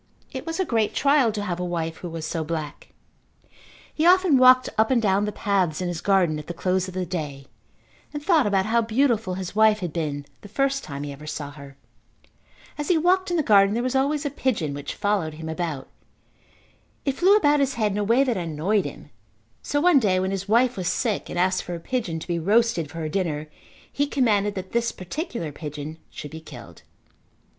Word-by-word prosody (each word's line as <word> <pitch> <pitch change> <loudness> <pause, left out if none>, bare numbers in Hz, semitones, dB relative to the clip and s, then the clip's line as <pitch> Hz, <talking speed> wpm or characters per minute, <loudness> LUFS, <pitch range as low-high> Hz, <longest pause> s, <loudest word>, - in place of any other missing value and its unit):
It 270 +3 -7
was 330 +3 -3
a 375 - +2
great 225 -7 0
trial 275 -4 +3
to 210 -1 -4
have 180 -3 -3
a - - -2
wife 165 -2 -3
who 175 - -7
was 165 -1 -5
so 165 0 -2
black. 155 -2 -5 1.1
He 310 - -1
often 360 -5 +5
walked 255 0 +7
up 220 0 +3
and 260 -2 +3
down 205 -2 +2
the 210 - -2
paths 195 -7 0
in 180 -1 -2
his 175 -2 -4
garden 180 -6 +2
at 150 - -10
the 175 - -5
close 185 +1 0
of 185 - -9
the 185 -1 -1
day 150 -6 -5 0.7
and 295 -1 -6
thought 325 - +4
about 195 -2 +2
how 230 +2 +2
beautiful 225 -4 +1
his 185 +1 -6
wife 220 0 +5
had 175 -6 -5
been 145 -4 -3 0.2
the - - -11
first 275 +5 0
time 140 -1 -6
he 145 - -5
ever 145 +2 -10
saw 145 -2 -5
her. 140 -1 -12 1.0
As 295 - -3
he 355 - +3
walked 370 +3 +2
in 350 - 0
the 315 - +2
garden 200 -3 +5
there 240 - 0
was 255 +1 -1
always 285 +3 +1
a 285 - -1
pigeon 225 - -1
which 145 0 -6
followed 205 -7 -1
him 160 +1 -7
about. 160 -4 -4 1.2
It 275 -2 -1
flew 380 +4 +5
about 295 -7 +3
his 275 -1 +1
head 215 -3 +1
in 200 - -2
a - - +1
way 230 +6 +4
that 245 -6 0
annoyed 175 +4 0
him, - - -9 0.5
so 290 - -1
one 335 -2 +5
day 190 -6 +2
when 190 +1 -1
his 195 +1 -4
wife 240 +2 +3
was 180 -2 -2
sick 225 0 -1
and - - -5
asked 185 +1 +2
for 175 - -6
a - - -6
pigeon 205 -4 -3
to 160 - -8
be 170 -1 -1
roasted 205 -3 +2
for 165 - -10
her 160 -1 -3
dinner 155 -4 -2 0.4
he 285 +1 0
commanded 210 -7 +1
that 190 -1 -6
this 235 0 0
particular 185 - -5
pigeon 150 +1 -7
should 150 - -9
be 160 0 -8
killed. 160 - -12
200 Hz, 215 wpm, -24 LUFS, 165-255 Hz, 1.2 s, walked